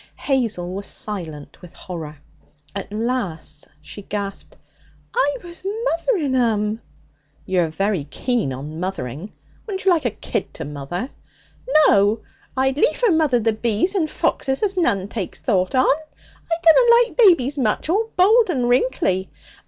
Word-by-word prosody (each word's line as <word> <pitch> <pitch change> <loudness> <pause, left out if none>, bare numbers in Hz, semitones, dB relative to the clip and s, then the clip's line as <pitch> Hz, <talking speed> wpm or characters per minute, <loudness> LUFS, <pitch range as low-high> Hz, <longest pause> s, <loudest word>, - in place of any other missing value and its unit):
Hazel 225 -10 -1
was 200 +1 -5
silent 165 -9 -6
with 180 -2 -14
horror. 160 -4 -7 0.6
At 200 0 -5
last 210 -10 -3 0.2
she 205 - -9
gasped: 200 0 -5 0.6
'I 290 -12 +2
was 345 0 -9
mothering 390 - 0
'em!' 220 -3 +1 0.6
'You're 180 -3 +1
very 190 -1 -1
keen 235 - -1
on 145 +5 -6
mothering! 175 - -4 0.4
Wouldn't 385 -2 -4
you 385 - +5
like 325 -6 +2
a - - +3
kid 210 - -4
to 160 - -5
mother?' 150 - -5 0.7
'No. 205 +2 +4 0.4
I'd 265 +1 +1
liefer 395 +10 +3
mother 310 -7 +3
the 225 0 +1
bees 230 - 0
and 335 -6 0
foxes 265 0 -1
as 400 -2 +1
none 200 - +1
takes 205 -4 -5
thought 185 -2 0
on. 255 - +4
I 315 +2 -3
dunna 470 +9 +7 0.2
like - - -18
babies 295 - +5
much 220 +1 0
all 425 +7 +1
bald 430 +4 +5
and 255 -8 0
wrinkly. 245 - +1
230 Hz, 145 wpm, -21 LUFS, -, 0.7 s, dunna